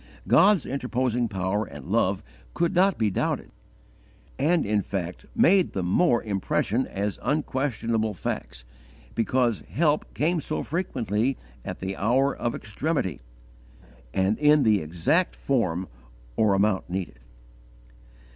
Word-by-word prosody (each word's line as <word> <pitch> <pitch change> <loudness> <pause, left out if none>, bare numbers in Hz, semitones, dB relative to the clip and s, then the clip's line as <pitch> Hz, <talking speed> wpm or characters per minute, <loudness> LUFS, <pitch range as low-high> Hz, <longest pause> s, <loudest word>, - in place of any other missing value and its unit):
God's 200 -5 +5
interposing 125 -2 -1
power 100 +1 -1
and 70 -8 -10
love - - +1 0.3
could 170 -1 +1
not 190 +2 +3
be 110 -2 +1
doubted, - - -2 0.9
and 160 +4 +2
in 105 0 +1
fact 90 -3 -5
made 185 0 +4
the 95 - -2
more 120 - +2
impression 105 +4 0
as 100 +1 -3
unquestionable 115 -7 -1
facts, - - -5 0.5
because 120 -1 +1
help 150 -1 +1
came 165 +2 +1
so - - -3
frequently 130 - -1 0.3
at - - -6
the 95 +1 -3
hour 130 +7 +2
of 120 - -2
extremity, 120 - -2 0.9
and 95 - +1
in 150 -1 +5
the 105 -3 +3
exact 85 - +1
form 95 -9 0 0.5
or 105 -3 +3
amount 100 -2 +1
needed. 90 -9 -4
115 Hz, 120 wpm, -26 LUFS, 95-145 Hz, 0.9 s, God's